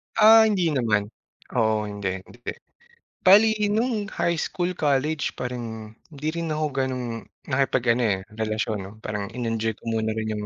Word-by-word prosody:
Ah, 220 0 +8
hindi 180 -6 +1
naman. 110 -7 +1 0.5
Oo, 110 -2 +2
hindi, 100 -1 -4 0.2
hindi. 120 - -17 0.9
Bale 205 +4 +8 0.3
no'ng 225 -2 0
high 170 0 +2
school, 180 +3 -2
college, 145 +1 0
parang 115 -3 -5 0.2
hindi 150 +1 -6
rin 165 -1 -2
ako 155 0 0
gano'ng 130 -2 -1 0.4
nakipag-ano, 130 -3 +2
eh, 95 -3 +1 0.2
relasyon, 110 0 -1
'no? 95 +1 -8
Parang 105 -2 -4
in-enjoy 115 -2 -1
ko - - -26
muna 110 -1 0
rin 110 0 -3
'yong 105 0 -4
125 Hz, 150 wpm, -25 LUFS, 110-160 Hz, 0.9 s, Ah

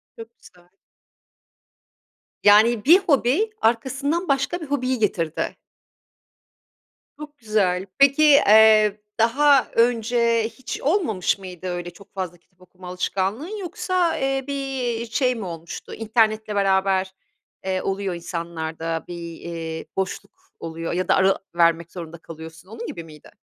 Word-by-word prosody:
Çok 225 +1 -12
güzel. 175 0 -20 1.7
Yani, 215 +2 +5
bir 345 +6 +8
hobi, 320 - +2
arkasından 275 +9 0
başka 275 +5 0
bir - - -5
hobiyi 260 -3 -1
getirdi. 165 -7 -1 1.6
Çok 300 -1 -10
güzel. 200 -5 0
Peki, 275 +2 +5
eee, 215 -6 +6 0.2
daha 275 +4 +4
önce 235 0 +2
hiç 260 - -7
olmamış 275 - +1
mıydı 185 -1 -9
öyle 175 0 -4
çok 200 +3 -18
fazla 180 -3 -5
kitap 180 +1 -37
okuma 180 0 -14
alışkanlığın 200 - -3
yoksa, 360 -2 -1
eee, 270 0 -1
bir 265 -4 -3
şey 250 +1 +1
mi 220 -4 -6
olmuştu 170 -1 -8
internetle 220 -1 0
beraber, 190 -1 +1 0.5
eee, 185 -1 -1
oluyor 195 -2 -2
insanlarda 165 -1 -4
bir, 170 -1 -7
eee, 165 -1 -6
boşluk 190 -1 -3 0.3
oluyor 165 0 -5
ya 185 +1 -1
da - - +4
ara 190 0 +3 0.2
vermek 170 -1 +2
zorunda 170 -2 -8
kalıyorsun. 160 +2 -12
Onun 230 +1 -7
gibi 170 - -7
miydi? 155 -2 -15
210 Hz, 125 wpm, -22 LUFS, 175-260 Hz, 1.7 s, bir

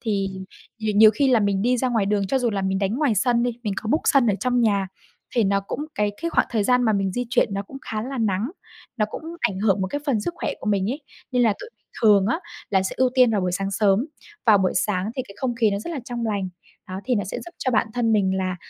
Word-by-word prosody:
Thì 200 -4 -1 0.5
nhiều 215 -1 -1
nhiều 215 +1 +9
khi 270 +6 +1
là 245 -3 +4
mình 200 -1 +1
đi 250 +2 +2
ra 255 +1 0
ngoài 225 -5 +1
đường, 200 -1 +1
cho 265 +8 +1
dù 245 -2 +1
là 195 -2 -2
mình 190 0 0
đánh 195 +2 0
ngoài 275 -3 +1
sân 235 +3 +2
đi, 245 - +1
mình 210 - -1
có 215 - -4
book 305 +7 +2
sân 275 -4 +4
ở 210 - +3
trong 245 -1 +1
nhà 200 -4 +2 0.5
thì 235 - +3
nó 200 0 +2
cũng 200 +9 -5
cái 210 0 +1
cái 335 - -1
khoảng - - +2
thời 220 -3 0
gian 250 +3 +3
mà 220 -3 +3
mình 195 -2 0
di 245 +3 -2
chuyển 230 -5 +2
nó 200 - -2
cũng 270 - -11
khá 215 -1 -4
là 260 +2 -5
nắng, 215 +2 0 0.5
nó 215 -3 +1
cũng - - -6 0.2
ảnh 205 -6 0
hưởng 200 -1 +2
một 190 - 0
cái 290 +9 -3
phần 245 -7 +1
sức 345 +11 -3
khỏe - - -2
của - - -8
mình 200 0 +1
ấy. 280 +5 -4 0.3
Nên 250 -1 +3
là 225 - +4
tụi - - -8
mình - - -45 0.2
thường 205 -3 +5
á, 235 +9 +1 0.3
là 190 -2 +3
sẽ 190 - -3
ưu 260 -1 +3
tiên 255 -3 +5
vào 210 - +1
buổi 180 -1 -1
sáng 195 +2 -2
sớm. 200 +5 +2 0.4
Vào 215 -3 +7
buổi 190 -1 +1
sáng 190 +1 0
thì 260 - -1
cái 200 - -11
không 245 -1 -1
khí 225 -2 +2
nó 200 - -1
rất 220 - -6
là 310 -5 -4
trong 240 -2 -3
lành, 200 -3 -1 0.4
đó, 185 +1 -5
thì 255 - +1
nó 205 -4 0
sẽ 185 - -5
giúp 345 - -10
cho 260 - -1
bản 235 - +2
thân 235 -2 +1
mình 190 -3 +2
là 185 -1 -2
215 Hz, 290 wpm, -23 LUFS, 195-245 Hz, 0.5 s, nhiều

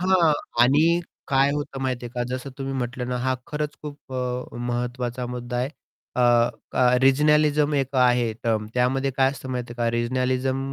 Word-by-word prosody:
हां, 180 -4 +4 0.3
आणि 155 +7 +4 0.3
काय 135 0 +3
होतं 145 -2 -4
माहिती 125 -2 -2
आहे - - -9
का? 120 - -1
जसं 130 +2 -5
तुम्ही 135 0 -3
म्हटलं 125 0 -3
ना, 125 - -1
हां, 130 +1 0
खरंच 150 0 -3
खूप 145 -3 -9
अ, 125 -2 -3
महत्त्वाचा 120 0 -3
मुद्दा 120 0 -5
आहे. 125 +2 0 0.5
अ, 125 - +1 0.5
क - - -7 0.3
रिजनलिझम 150 +2 +4
एक 135 -1 -1
आहे 125 -2 +3
टर्म. 110 -2 0
त्यामध्ये 135 +2 +1
काय 135 0 +4
असतं 130 -1 -9
माहिती 125 -2 -4
आहे 120 - -14
का 115 - +2
रिजनलिझम 130 +2 0
130 Hz, 175 wpm, -24 LUFS, 125-140 Hz, 0.5 s, हां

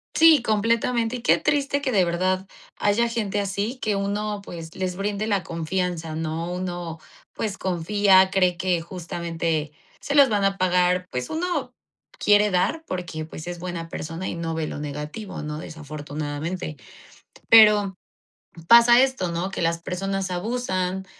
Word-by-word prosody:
Sí, 320 -5 +7
completamente, 230 +2 +1
y - - -9
qué - - +4
triste 285 -1 0
que 265 - -1
de 195 -5 +4
verdad 185 +2 0 0.3
haya 215 +3 +2
gente 210 -3 -2
así, 200 +5 -2
que 210 -2 0
uno, 205 +1 -2
pues, 165 -3 -9
les 185 -1 -2
brinde 205 +2 -2
la 200 -4 +1
confianza, 165 -1 -3
¿no? 160 +2 -3
uno, 175 -2 -4 0.4
pues, 205 -3 -3
confía, 190 +1 +3
cree 185 -3 +2
que 180 -2 0
justamente 165 -3 -3 0.3
se 285 - -3
los 280 -3 +7
van 205 -2 +1
a 195 0 +1
pagar 180 0 +2
Pues 125 0 -3
uno 320 -6 -2 0.4
quiere 210 0 +4
dar 200 - 0
porque, 170 -4 -4
pues, 155 0 -9
es 175 0 -6
buena 170 -2 -5
persona 165 +3 -5
y - - -3
no 165 -1 -3
ve 160 -1 -1
lo 150 - -6
negativo, 150 +7 -6
¿no?, 150 0 -5
desafortunadamente. 150 +1 -5 0.7
Pero 210 -4 +7 0.7
pasa 235 +1 +8
esto, 260 -10 0
¿no?, 175 +3 -2
que 190 - -4
las 165 0 0
personas 195 +2 -3
abusan, 190 -2 -2
185 Hz, 155 wpm, -24 LUFS, 170-210 Hz, 0.7 s, pasa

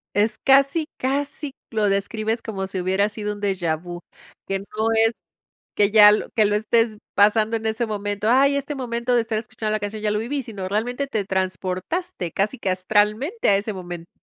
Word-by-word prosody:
Es 210 +2 +2
casi 275 +4 +4
casi 280 +1 -2 0.2
lo 215 -3 +1
describes 215 +3 -1
como 195 -4 -4
si 190 -1 -4
hubiera 190 +3 +1
sido 210 0 -4
un 205 - -10
deja 185 -5 0
vu, 175 +2 -8 0.5
que 195 0 -1
no 200 - -10 0.4
es 225 - +3 0.6
que 205 0 +3
ya 210 -1 +9
lo 210 - 0
que 220 -3 +4
lo 205 0 +1
estés 220 +1 +1 0.2
pasando 215 +2 +4
en 225 - -9
ese 220 +2 0
momento. 205 -1 -3
Ay, 275 +3 +4
este 280 +1 -3
momento 245 -1 -1
de 235 - +4
estar 225 -1 -2
escuchando 215 -1 -5
la 215 - 0
canción 210 +1 -5
ya 210 - +1
lo 210 - 0
viví, 270 +6 -2
sino 205 -6 -6
realmente 245 +7 -2
te 215 -7 -2
transportaste 185 - -3
casi 215 +5 -1
que 195 - -2
astralmente 210 - +1
a 195 - +5
ese 210 +2 -3
momento. 175 -2 -8
215 Hz, 195 wpm, -23 LUFS, 200-235 Hz, 0.6 s, ya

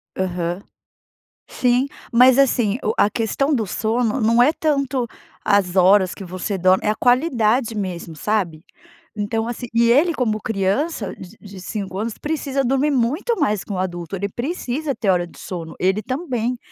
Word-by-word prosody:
Aham. 180 0 -2 0.8
Sim, 250 +2 +1 0.2
mas, 250 +2 +6
assim, 240 -5 +2
o 215 - 0
a 205 - +4
questão 245 +7 0
do 225 -6 0
sono 225 +5 0
não 230 +2 +4
é 285 +6 +5
tanto 275 -5 0 0.4
as 200 -3 +2
horas 190 0 +5
que - - -8
você 185 +2 -4
dorme, 185 +2 +3
é - - +2
a 215 - +1
qualidade 245 -3 +2
mesmo, 180 -5 -5
sabe? 175 -3 -1 0.5
Então, 220 +2 -2
assim 240 +1 -5
e 235 0 +4
ele 315 +7 +4
como 220 -6 -1
criança 210 - -1
de 190 +4 -12
de 195 -2 -11
5 195 -1 -5
anos 220 +1 -3
precisa 285 -3 -2
dormir 270 +4 +1
muito 290 - 0
mais 210 - +1
que - - -9
um - - -3
adulto, 175 -1 -4
ele 200 +1 -3
precisa 275 - -3
ter 210 - -1
hora 175 -2 +2
de - - -17
sono, 165 -3 -7
ele 190 +3 +1
também, 250 - -2
220 Hz, 170 wpm, -21 LUFS, 190-255 Hz, 0.8 s, mas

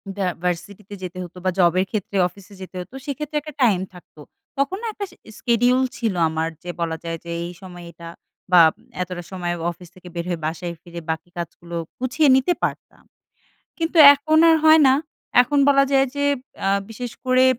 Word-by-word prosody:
ভ্য 200 - -4 0.2
ভার্সিটিতে 190 +3 -4
যেতে 185 0 -6
হতো 180 +1 -11
বা, 185 - +3
জবের 180 +1 +4
ক্ষেত্রে 200 -2 -3
অফিসে 200 +2 -16
যেতে 185 - -10
হতো। 180 - -12
সেক্ষেত্রে 300 +1 -5
একটা 305 +1 -9
টাইম 205 -7 +4
থাকতো। 175 -3 -16 0.4
তখন 280 +8 0
না 465 - -4
একটা 405 - -4
sch - - -20 0.2
schedule 245 +2 +2
ছিল 225 -4 -1 0.2
আমার। 160 +1 -1
যে 180 - -7
বলা 165 -1 -1
যায় 165 -1 -4
যে, 170 - -6
এই 175 - -7
সময় 175 -2 -10
এটা 170 -1 -10 0.4
বা, 175 - +9 0.4
এতটা 180 -1 -5
সময় 175 -2 -3 0.2
অফিস 175 0 -14
থেকে 185 -1 -14
বের 170 0 -3
হয়ে 170 -2 -3
বাসায় 170 +2 -4
ফিরে 170 -1 -8
বাকি 170 +3 -6
কাজগুলো 170 0 -7 0.2
গুছিয়ে 260 +4 +2
নিতে 265 +7 +2
পারতাম। - - -4 0.7
কিন্তু 330 +1 -2 0.2
এখন 310 +2 +1
আর 325 - +6
হয় 315 0 +8
না। 260 - +6 0.5
এখন 285 +4 0
বলা 275 -1 +5
যায় 270 0 +4
যে, 285 0 0 0.4
আ - - +3 0.2
বিশেষ 235 +1 -6
করে 255 0 +4
190 Hz, 185 wpm, -22 LUFS, 175-265 Hz, 0.7 s, বা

